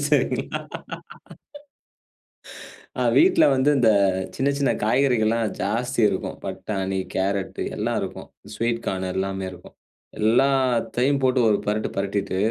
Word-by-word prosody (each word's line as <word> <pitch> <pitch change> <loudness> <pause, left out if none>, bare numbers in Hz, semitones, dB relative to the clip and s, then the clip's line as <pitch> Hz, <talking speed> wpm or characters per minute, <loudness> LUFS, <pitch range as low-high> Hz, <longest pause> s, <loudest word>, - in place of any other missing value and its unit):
சரிங்களா - - 0 2.4
ஆ, - - 0 0.2
வீட்ல 360 +3 +5
வந்து 130 +2 +2
இந்த 120 -4 +4 0.5
சின்ன 135 +1 +1
சின்ன 140 - +2
காய்கறிகள்லாம் 115 -2 +2
ஜாஸ்தி 120 +5 -1
இருக்கும். 95 - -4
பட்டாணி, 95 -2 -3 0.2
கேரட்டு 95 0 -1
எல்லா - - -1
இருக்கும். - - -6 0.3
ஸ்வீட் 115 0 -1
கார்னு 95 -1 -2
எல்லாமே 95 0 -2
இருக்கும். 90 -1 -14 0.4
எல்லாத்தையும் 130 +3 +2
போட்டு 130 0 +3
ஒரு 105 - +3
பெரட்டு, 105 +1 -1
பெரட்டிட்டு 100 -1 -2
115 Hz, 110 wpm, -23 LUFS, 100-130 Hz, 2.4 s, வீட்ல